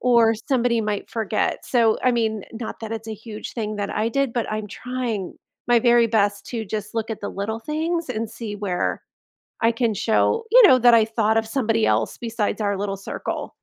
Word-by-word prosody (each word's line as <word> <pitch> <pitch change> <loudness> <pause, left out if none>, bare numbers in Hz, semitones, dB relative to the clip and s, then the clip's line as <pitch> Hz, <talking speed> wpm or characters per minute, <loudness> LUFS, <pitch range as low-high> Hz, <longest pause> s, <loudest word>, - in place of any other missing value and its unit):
or 235 -2 +4 0.2
somebody 245 -3 +2
might 210 -1 -3
forget, 220 -2 -1
so, 230 -3 +3
I 255 - +3
mean, 220 -3 -1
not 225 0 -6
that 225 0 -5
it's 225 0 -6
a 220 - -4
huge 215 0 -8
thing 215 -2 -3
that 205 -1 -3
I 220 +2 0
did, 275 -1 0
but 235 - -1
I'm 215 -1 -3
trying 240 -5 -4 0.3
my 240 -1 +5
very 240 -1 +5
best 205 -2 +1
to 230 -3 -4
just 210 +1 -5
look 225 0 -2
at 220 - -4
the 205 - -4
little 215 +3 -3
things 320 +4 -2
and 225 -2 -3
see 220 -3 -6
where 195 -3 -2 0.6
I 230 0 +3
can 230 -1 0
show, 225 - +1
you - - +9
know, 255 - +7
that 240 0 +6
I 225 -1 +6
thought 220 -1 +1
of 220 0 -2
somebody 225 -3 +1
else - - +1
besides 230 -2 -2
our 200 -2 0
little 195 0 -2
circle. 195 - -5
225 Hz, 205 wpm, -23 LUFS, 215-240 Hz, 0.6 s, you